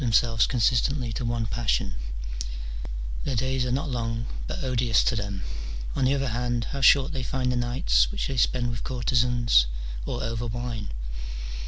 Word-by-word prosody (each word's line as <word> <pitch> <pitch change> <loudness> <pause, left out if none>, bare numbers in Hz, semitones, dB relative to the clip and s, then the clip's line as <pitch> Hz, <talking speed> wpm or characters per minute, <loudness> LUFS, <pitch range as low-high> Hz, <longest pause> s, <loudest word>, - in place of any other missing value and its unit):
313 125 - +1 0.2
themselves 115 -2 +3
consistently 125 +1 +2
to 125 - -3
one 115 -1 0
passion: 110 +1 0 1.3
their 135 - -1
days 130 +1 +1
are - - -1
not 135 +4 0
long, 115 -3 -2 0.2
but - - -4
odious 120 -4 +3
to 125 - +2
them: 100 -2 -3 0.5
on 135 - +2
the 135 +2 +4
other 135 -1 0
hand, 120 0 0
how 140 - -3
short 135 +2 +6
they 135 -4 -2
find 125 0 -1
the - - 0
nights - - +2
which - - -2
they 135 - -3
spend 120 0 +2
with 115 -2 -4
courtezans 120 - +3 0.4
or - - -2
over 115 +1 -2
wine 115 -2 -4
120 Hz, 170 wpm, -26 LUFS, 115-130 Hz, 1.3 s, short